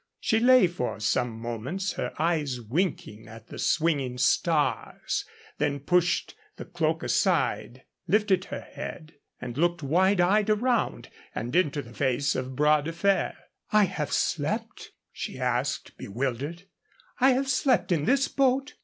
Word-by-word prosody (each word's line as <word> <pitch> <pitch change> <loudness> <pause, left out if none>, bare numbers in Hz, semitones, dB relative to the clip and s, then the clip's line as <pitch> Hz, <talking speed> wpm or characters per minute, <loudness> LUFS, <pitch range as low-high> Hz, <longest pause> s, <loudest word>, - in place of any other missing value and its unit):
She 220 - +1
lay 250 -1 +6
for 170 -11 -3
some 110 +2 0
moments, 125 - -3
her - - -3
eyes 150 -6 0
winking 115 - -3
at 110 0 -13
the - - -9
swinging 145 -6 +1
stars, 140 -1 0 0.3
then 145 -1 0
pushed 175 +4 +1 0.2
the - - -8
cloak - - -1
aside, - - 0 0.2
lifted 205 -3 +2
her - - -6
head, 155 -1 -8 0.3
and 125 +1 -6
looked 175 -1 +1
wide 185 +7 +2
eyed 205 +4 +3
around 235 +3 0 0.3
and 120 +3 -4
into 150 -5 +1
the 120 -1 -13
face 135 +2 0
of 130 0 -4
Bras 150 +1 +3
de 165 - -3
Fer. 195 +4 +1 0.4
"I 210 -1 +5
have 190 - -2
slept?" - - -2 0.2
she - - -6
asked, - - -1
bewildered 135 - -4 0.6
"I 265 +1 +5
have 265 +2 0
slept 255 -4 +2
in 155 -4 +1
this 270 +5 +3
boat?" 270 +1 +1
165 Hz, 145 wpm, -27 LUFS, 130-200 Hz, 0.6 s, lay